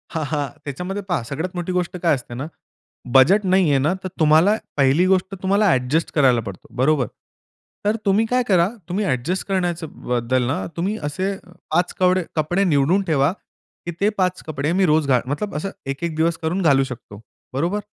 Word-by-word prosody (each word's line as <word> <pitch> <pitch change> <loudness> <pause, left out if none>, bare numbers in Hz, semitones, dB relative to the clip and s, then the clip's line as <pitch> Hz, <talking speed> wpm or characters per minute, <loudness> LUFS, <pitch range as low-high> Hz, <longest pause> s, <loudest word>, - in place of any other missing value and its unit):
हां, 160 - 0
हां. 145 -2 0 0.2
त्याच्यामध्ये 180 +8 -4
पहा 175 -10 -1
सगळ्यात 160 +6 -4
मोठी 175 +1 -3
गोष्ट 180 0 -2
काय 170 - +4
असते 125 -2 -9
ना? 130 +4 -4 0.7
बजेट 190 +11 +6
नाहीये 185 -6 +3
ना, 150 +6 +1
तर - - -2
तुम्हाला 160 +6 +5 0.2
पहिली 140 +5 +4
गोष्ट 190 +1 +1
तुम्हाला 200 +3 +2
ॲडजस्ट 130 +5 0
करायला 130 -5 +4
पडतो. 100 -4 -9
बरोबर? 130 0 +2 0.8
तर 210 +1 +2
तुम्ही 200 +3 +3
काय 250 0 +2
करा, 180 -3 +4 0.2
तुम्ही 200 +4 -1
ॲडजस्ट 145 +7 -1
करण्याच्या 175 -4 -1 0.2
बद्दल 125 +1 0
ना, 130 - -1
तुम्ही 195 +6 -1
असे 185 +7 -2 0.4
5 175 +3 +1
कवडे 185 0 +3
कपडे 175 +5 +1
निवडून 165 +2 +3
ठेवा. 145 -2 +2 0.5
की 175 - -3
ते 200 - +4
5 185 -1 0
कपडे 150 0 -2
मी 190 - +4
रोज 155 -2 +2
घाल 130 -3 +3
मतलब 200 +9 -3
असं 155 +6 -2 0.2
एक, 135 +3 -5
एक 170 -2 -2
दिवस 165 +1 +1
करून 170 +4 -2
घालू 140 -5 +4
शकतो. 120 -6 -9 0.3
बरोबर? 170 +10 0
165 Hz, 180 wpm, -21 LUFS, 140-185 Hz, 0.8 s, बजेट